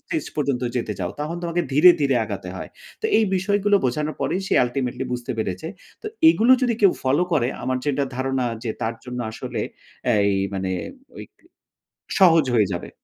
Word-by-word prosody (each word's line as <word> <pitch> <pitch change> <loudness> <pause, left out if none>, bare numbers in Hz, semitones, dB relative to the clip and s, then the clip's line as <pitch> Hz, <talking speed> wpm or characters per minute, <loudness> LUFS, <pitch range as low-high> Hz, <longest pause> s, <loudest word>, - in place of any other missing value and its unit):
stage 315 +2 -4
পর্যন্ত 140 -4 0
যেতে 115 -3 -2
চাও। 90 -2 -2
তখন 155 +3 -3
তোমাকে 170 0 -1
ধীরে, 155 +6 +8
ধীরে 140 -2 +2
আগাতে 100 -3 -6
হয়। - - -7 0.3
তো - - -15
এই 225 - +4
বিষয়গুলো 205 +2 +2
বোঝানোর 150 +5 -1
পরেই 185 - 0
সে - - 0
ultimately 125 +1 -3
বুঝতে 125 +1 -3
পেরেছে। 110 - -3 0.3
তো 430 - -7 0.2
এগুলো 250 -5 +5
যদি 245 -2 +2
কেউ 200 -4 +6
follow 140 +6 +2
করে 135 -6 +2
আমার 130 +1 -1
যেটা 145 -1 0
ধারণা 130 0 -1 0.2
যে 115 - -1
তার 115 +1 -1
জন্য 125 -1 -6
আসলে - - -5 0.5
অ্যা 120 - +3 0.2
এই 100 - +1 0.2
মানে 95 -1 -2 0.5
ঐইক - - -10 0.9
সহজ 165 -6 +6
হয়ে 105 -4 +4
যাবে। 85 - -5
135 Hz, 180 wpm, -23 LUFS, 120-175 Hz, 0.9 s, ধীরে